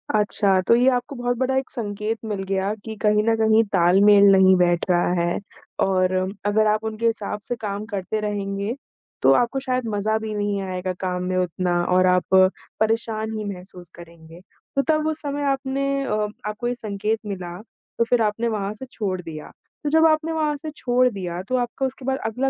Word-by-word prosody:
अच्छा, 200 -2 +3
तो 230 - +4
ये 245 +2 +3
आपको 245 +3 -4
बहुत 245 0 -1
बड़ा 265 +1 0
एक 265 - -2
संकेत 215 0 -3
मिल 205 -3 -3
गया 195 +1 -1
कि 220 -1 -6
कहीं 210 -1 +3
न 225 - +3
कहीं 220 0 +4
तालमेल 195 +3 +6
नहीं 190 -1 +6
बैठ 175 -1 +2
रहा 175 0 +2
है 175 0 0 0.5
और 185 -1 +1 0.3
अगर 215 +1 +3
आप 215 +1 -2
उनके 220 +1 -3
हिसाब 210 -2 -1
से 240 +4 -4
काम 210 -1 -5
करते 210 0 -3
रहेंगे, 200 +1 -3 0.5
तो 135 - +5
आपको 245 - +1
शायद 255 -2 -2
मज़ा 215 +2 0
भी 220 -1 -5
नहीं 205 -1 -1
आएगा 185 0 -3
काम 180 -1 -2
में 185 - -1
उतना 180 0 0 0.2
और 185 0 +5
आप 180 +1 +1 0.4
परेशान 220 0 0
ही 215 - -4
महसूस 180 -1 -11
करेंगे। 170 -1 -14 0.4
तो 275 - +3
तब 310 0 +1
उस 315 0 -2
समय 285 0 -3
आपने 275 +1 -1
अ, 210 -4 -1 0.2
आपको 215 +3 -3
ये 245 - -1
संकेत 215 -1 -2
मिला, 180 -4 -5 0.4
तो - - +3
फिर 230 0 +1
आपने 220 +2 0
वहाँ 205 -2 -2
से 260 +5 -9
छोड़ 190 -4 -3
दिया। 155 -3 -9 0.3
तो 295 - 0
जब 320 +1 +4
आपने 315 +1 +1
वहाँ 305 -2 0
से 310 +2 -6
छोड़ 250 -2 +2
दिया 180 -4 -5
तो 255 - 0
आपका 245 +2 -2
उसके 260 0 -6
बाद 265 0 0
अगला 250 +5 0
215 Hz, 195 wpm, -23 LUFS, 190-245 Hz, 0.5 s, तालमेल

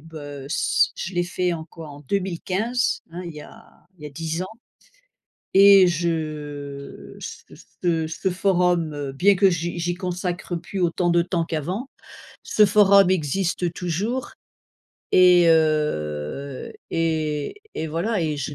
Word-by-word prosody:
bah, 160 +1 -11
heu, 145 -2 -8
c' - - +2
je 185 - -5
l'ai 175 - +2
fait 180 0 -1
en 160 -2 -5
quoi 165 -1 -11
en 145 0 -11
2015 195 - -1
hein, 180 - -6
il 170 - -6
y 150 - -8
a - - -14 0.3
il - - -16
y - - -4
a - - -8
10 165 +4 -3
ans - - -4 1.1
et 195 -1 +8
je 150 -4 -4
ce - - -9 0.3
ce 165 -2 +1
ce 175 +4 -2
forum, 175 -6 0
bien 200 +9 +4
que 195 +1 +5
j'y 170 0 -3
j'y 175 +1 -1
consacre 180 0 -3
plus 190 +3 -5
autant 175 +1 +1
de 170 0 +4
temps 170 -1 -1
qu'avant, 180 - -3 0.6
ce 210 - +4
forum 200 -2 +6
existe 175 +1 0
toujours 195 +10 -3 0.8
et 180 -1 +6
heu 140 - 0 0.2
et 155 -3 -1 0.2
et 160 - -3
voilà 180 +7 -1
et 155 -2 -1
je 145 +1 -4
170 Hz, 150 wpm, -23 LUFS, 155-185 Hz, 1.1 s, et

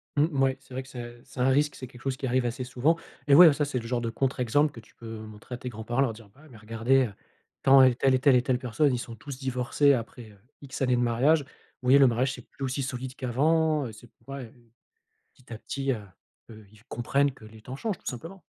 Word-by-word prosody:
Mmh, 145 +1 +4
mouais, 135 -2 +1
c'est 130 -1 -16
vrai 130 - -4
que 130 - -16
c'est 120 -2 -9
c'est - - -12
un 125 +2 +3
risque, 145 +1 +2
c'est 130 - -8
quelque 125 0 -15
chose 135 -1 -2
qui 135 - -4
arrive 130 0 +1
assez 125 +2 -3
souvent 125 +6 +1 0.3
et 140 - +6
ouais, 175 +2 +10
heu, 155 - +6
ça 145 +1 0
c'est 140 -3 -2
le 115 - -8
genre 120 -1 -1
de 115 - -2
contre-exemple 135 +4 +1
que 115 - -11
tu 110 - -20
peux 115 -1 -8
montrer 110 +2 -9
à - - -8
tes 125 - -6
grands-parents, 120 +3 -2
leur 130 -5 +1
dire: 110 -2 -15
«Bah, 145 - -20
ouais, 155 - -17
mais 120 - -14
regardez, 115 +5 +1
heu, 105 - -7 0.5
tant, 135 0 +7
elle, 130 -2 +5
telle 135 -1 +3
et - - +1
telle 135 -1 +5
et 125 - +4
telle 125 0 0
personne, 130 +3 +1
ils - - 0
sont 120 -1 -7
tous 130 +5 -9
divorcés 130 +2 +2
après, 115 -2 -5
heu, 100 - -19 0.2
X 135 -1 -8
années 125 -2 +3
de 120 - +1
mariage. 125 +7 +3
Vous 135 - -20 0.4
voyez, 140 +2 +7
le 135 - +7
mariage 125 +3 +1
c'est 125 - -9
plus 140 - -9
aussi 130 +2 -2
solide 130 0 -5
qu'avant, 150 +4 +1
heu, - - -8
c'est 110 +2 -14
plus - - -34
pareil, 135 -3 -7
heu». 120 -2 -23 0.6
Petit 125 -2 -13
à - - -6
petit, 135 +4 -3
heu 125 - -1 0.5
heu, 110 -1 -13
ils - - -18
v - - -24
comprennent 140 +4 +1
que 120 -4 -16
les 110 0 -14
temps 125 +4 -8
changent, 210 +4 -3
tout - - -31
simplement! 165 +10 -7
130 Hz, 275 wpm, -27 LUFS, 120-140 Hz, 0.6 s, ouais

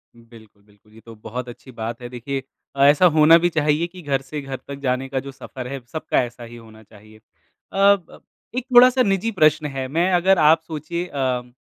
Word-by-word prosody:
उम, 115 - -19
बिल्कुल, 110 -3 -18
बिल्कुल 105 +1 -27
ये 110 - -16
तो 115 -1 -12
बहुत 120 +3 -7
अच्छी 130 +2 -13
बात 115 +1 -6
है। 120 - -7
देखिए 130 +2 -5 0.3
अ, 140 - +2
ऐसा 145 +5 +5
होना 155 +2 +7
भी 175 +1 +1
चाहिए 155 +1 0
कि 180 +1 -13
घर 140 -4 -1
से 145 +2 -7
घर 135 -1 -6
तक 140 0 -7
जाने 130 -1 -2
का 135 - -2
जो 140 +1 -8
सफ़र 130 -1 -9
है, 135 +1 -6
सबका 155 0 -1
ऐसा 120 0 -9
ही 120 0 -11
होना 110 -1 -15
चाहिए। 110 +1 -18
अ, 110 - -26 0.5
ब 195 -3 +2 0.3
एक 255 -1 -3
थोड़ा-सा 255 +1 +7
निजी 195 +2 0
प्रश्न 155 0 +3
है, 135 -2 -5
मैं 170 +6 0
अगर 185 +2 +3
आप 160 +1 +5
सोचिए 165 +2 -5
अम 125 -4 -3
135 Hz, 215 wpm, -21 LUFS, 120-160 Hz, 0.5 s, होना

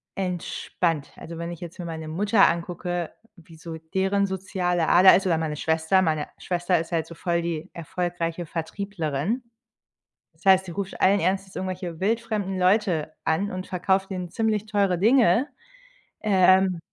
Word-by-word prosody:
entspannt. 175 -4 -2
Also, 165 0 -8
wenn 170 +1 -4
ich 170 - -8
jetzt 175 +1 -8
mir 175 - -5
meine 160 -1 -6
Mutter 200 +6 +4
angucke, 175 0 -3 0.2
wie 165 -2 -16
so 165 0 -7
deren 190 +5 0
soziale 180 -3 -1
Ader 185 +2 +8
ist 195 - +1
oder 165 -3 +2
meine 155 -2 -2
Schwester. 160 +4 +2
Meine 155 -4 0
Schwester 175 0 0
ist 165 - -6
halt 165 -2 0
so 170 - -10
voll 170 0 -1
die 165 -2 -4
erfolgreiche 170 0 -3
Vertrieblerin. 170 - -3 0.9
Das - - -25
heißt, 190 -1 +6
sie 175 - -7
ruft 195 +2 -5
allen 200 +2 +5
Ernstes 190 +1 -1
irgendwelche 180 -3 -4
wildfremden 215 -2 -1
Leute 180 -5 +2
an 185 +6 0
und 185 0 -5
verkauft 190 +1 0
denen 180 -2 -4
ziemlich 220 -1 0
teure 200 -4 +1
Dinge, 230 +1 +4 0.7
ähm 185 -3 +4
180 Hz, 155 wpm, -25 LUFS, 165-195 Hz, 0.9 s, Ader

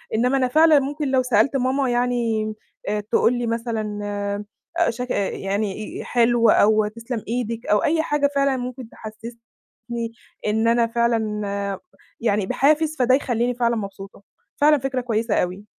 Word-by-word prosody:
إنما 250 +4 +2
أنا 255 - +2
فعلًا 310 +3 +5
ممكن 285 +2 -3
لو 260 -1 +3
سألت 250 +2 +2
ماما 260 +1 +1
يعني 235 -3 0 0.3
آآ 210 +1 0
تقول 215 +3 +2
لي 240 -1 -2
مثلًا 225 -2 -3 0.8
آآ 340 - +3
شك 250 +2 -4
إ 200 -1 0
يعني 200 +1 -3
آآ - - -7
حلو 235 -1 +3
أو 215 0 +4
تسلم 230 +1 -6
إيدِك 230 0 -3
أو 210 0 +2
أي 320 +1 +2
حاجة 295 -2 +1
فعلًا 275 -1 +2
ممكن 250 -1 -6
تحسّسني 230 +1 -9 0.3
إن 220 +2 +1
أنا 235 0 +3
فعلًا 210 -4 -1 0.4
يعني 210 -3 +1
بحافز، 305 +6 +2
فده 255 +1 +5
يخلّيني 245 -2 0
فعلًا 235 -1 +1
مبسوطة. 195 -2 -7 0.4
فعلًا 300 +1 +6
فكرة 265 -1 -2
كويسة 225 -2 -1
أوي. 185 +3 -1
235 Hz, 150 wpm, -22 LUFS, 215-255 Hz, 0.8 s, فعلًا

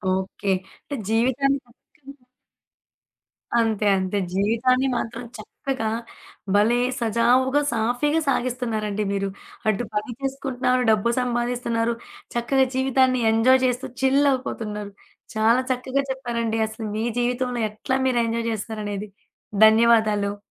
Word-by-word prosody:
Okay. 190 +1 -2 0.3
అంటే, 285 - -6
జీవితాన్ని 260 +5 +2
చక్కగా 265 +2 -18 1.4
అంతే. 220 -2 +1
అంతే. 190 +2 -1 0.2
జీవితాన్ని 235 +7 +2
మాత్రం 235 +1 -4
చక్కగా, 225 +1 -4 0.7
భలే 225 +4 +4 0.2
సజావుగా, 250 +5 +3
సాఫీగా 245 +8 +1
సాగిస్తున్నారండి 230 -5 -1
మీరు. 195 0 -1 0.4
అటు 215 +3 0
పని 210 +4 -2
చేసుకుంటున్నారు, 265 -2 0
డబ్బు 220 +2 +2
సంపాదిస్తున్నారు, 240 -1 -1 0.4
చక్కగా 265 +3 +2
జీవితాన్ని 260 -1 +2
ఎంజాయ్ 255 +4 +4
చేస్తూ 255 +1 -1
చిల్లవుపోతున్నారు. 260 -7 0 0.4
చాలా 225 +4 +4
చక్కగా 255 +2 0
చెప్పారండి 235 -4 -2
అసలు 220 0 -7
మీ 220 +1 -1
జీవితంలో 245 0 -1
ఎట్లా 215 +5 -3
మీరు 250 -2 +2
ఎంజాయ్ 230 0 -2
జేస్తున్నారనేది. 210 -1 -4 0.6
ధన్యవాదాలు. 220 -2 +4
235 Hz, 100 wpm, -23 LUFS, 220-260 Hz, 1.4 s, భలే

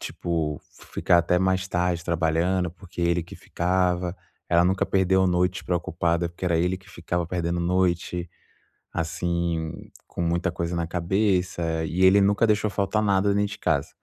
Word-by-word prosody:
tipo, 80 -4 -3 0.3
ficar 90 -2 +3
até 85 +1 +2
mais 95 +1 0
tarde 90 -1 0
trabalhando, 85 +2 +1
porque 90 +1 -10
ele 85 0 +1
que 85 - -12
ficava. 90 0 0 0.3
Ela 85 0 +4
nunca 95 +1 +2
perdeu 95 0 +2
noite 90 +1 +1
preocupada, 85 -1 -1
porque 85 +2 -8
era 85 -2 +2
ele 90 +2 +1
que 95 +2 -18
ficava 85 +1 -3
perdendo 85 -1 -2
noite, 90 -1 0 0.6
assim, 85 -1 -2 0.2
com - - -5
muita 85 +1 0
coisa 85 -1 -3
na 85 -1 -1
cabeça. 90 -2 0
E 90 +3 -1
ele 95 +2 +7
nunca 100 +3 +3
deixou 105 0 +2
faltar 100 +1 0
nada 100 -1 +2
dentro 105 0 0
de - - -11
casa. 70 -3 0
90 Hz, 160 wpm, -25 LUFS, 85-95 Hz, 0.6 s, ele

